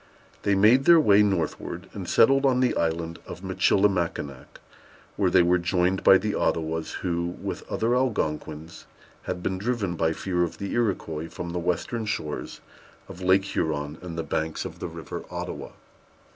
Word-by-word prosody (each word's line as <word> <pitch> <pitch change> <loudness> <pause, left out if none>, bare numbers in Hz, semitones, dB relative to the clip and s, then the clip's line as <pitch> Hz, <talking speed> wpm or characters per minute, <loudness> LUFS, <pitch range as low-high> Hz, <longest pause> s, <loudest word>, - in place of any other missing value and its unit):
They 100 - +2
made 110 +7 +5
their 170 -1 +8
way 105 -8 +5
northward, 95 -6 -1
and - - -6
settled 135 +4 +5
on 130 -2 +3
the 130 -1 +2
Island 85 0 -1
of - - -9
Michilimackinac, 85 -9 0 0.6
where - - +2
they - - +5
were 90 +1 +3
joined 90 +2 +1
by 95 - +8
the 105 +1 -2
Ottawas, 80 0 -1
who, 85 -1 -1
with - - -4
other 115 +2 +1
Algonquins, 80 -10 -2 0.4
had 90 -1 -4
been 95 -1 -2
driven 105 -5 -1
by 80 -1 +1
fear 90 +1 -2
of 85 - -1
the 100 - -5
Iroquois 85 -8 -1
from 85 -1 -6
the 90 - -2
western 100 +6 -2
shores 75 -8 -4 0.5
of 95 -1 -10
Lake 95 +1 +3
Huron 75 -4 -2
and 85 -2 -7
the 80 - -1
banks 80 0 -2
of - - -8
the - - -4
River - - -7
Ottawa. - - -6
90 Hz, 165 wpm, -26 LUFS, 80-105 Hz, 0.6 s, their